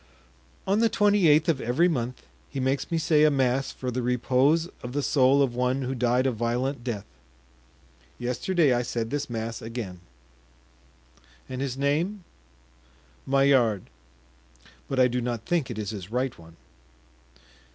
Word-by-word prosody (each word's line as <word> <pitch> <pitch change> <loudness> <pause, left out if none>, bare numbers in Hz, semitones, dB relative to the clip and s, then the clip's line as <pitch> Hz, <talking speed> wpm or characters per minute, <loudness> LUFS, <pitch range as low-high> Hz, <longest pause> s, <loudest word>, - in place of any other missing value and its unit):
"On 200 +2 +2
the 230 0 +4
twenty 205 -4 +3
eighth 155 +1 +5
of 155 -6 +1
every 130 +10 +2
month 125 -6 -3 0.2
he 135 - -5
makes 130 +1 -1
me 165 - 0
say 155 -1 +3
a 155 - +6
mass 135 -1 +1
for 125 -1 -5
the 125 +1 -2
repose 130 +6 +2
of 125 0 -7
the 145 0 -1
soul 135 0 +4
of 130 -3 -1
one 125 +2 0
who 130 +1 -2
died 125 +1 +1
a 135 - +2
violent 120 +3 -2
death; 115 -5 -4 1.1
yesterday 140 +5 +1
I 120 - +1
said 115 -1 -3
this 145 -1 -2
mass 115 -1 -4
again." 110 -6 -6 1.5
"And 130 0 -5
his 135 -2 -3
name?" 165 +9 0 1.0
"Maillard; 130 -7 +2 1.0
but 135 - -1
I 130 - +6
do 125 0 -2
not 120 -2 -3
think 170 -6 0
it 120 - -5
is 105 -2 -3
his 100 -3 -7
right 125 +2 -1
one." 80 0 -16
130 Hz, 155 wpm, -26 LUFS, 120-145 Hz, 1.5 s, a